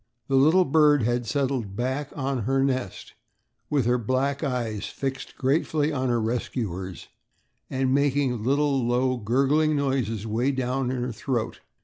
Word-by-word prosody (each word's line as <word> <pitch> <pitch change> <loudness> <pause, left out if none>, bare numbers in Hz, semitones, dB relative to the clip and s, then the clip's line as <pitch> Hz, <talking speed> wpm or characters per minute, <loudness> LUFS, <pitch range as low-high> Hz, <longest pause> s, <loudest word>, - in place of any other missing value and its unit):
The 135 - +2
little 160 +7 +5
bird 150 -2 +4
had 120 +1 0
settled 130 -5 -1
back 130 +5 -2
on 135 -1 -1
her 135 +2 +2
nest 130 -7 -2 0.6
with 140 -5 +1
her 125 +1 +2
black 135 +5 -1
eyes 120 -7 -2
fixed 135 -1 -5
gratefully 150 +2 +1
on 130 -2 -1
her 120 -1 +2
rescuers 110 -6 -3 0.6
and 130 0 0
making 140 -4 +1
little, 140 +1 +2
low, 125 +2 +1
gurgling 140 +7 +2
noises 130 -7 -1
way 120 +5 0
down 130 0 -1
in 125 -1 -2
her 125 - -2
throat. 120 0 -3
130 Hz, 145 wpm, -25 LUFS, 120-140 Hz, 0.6 s, little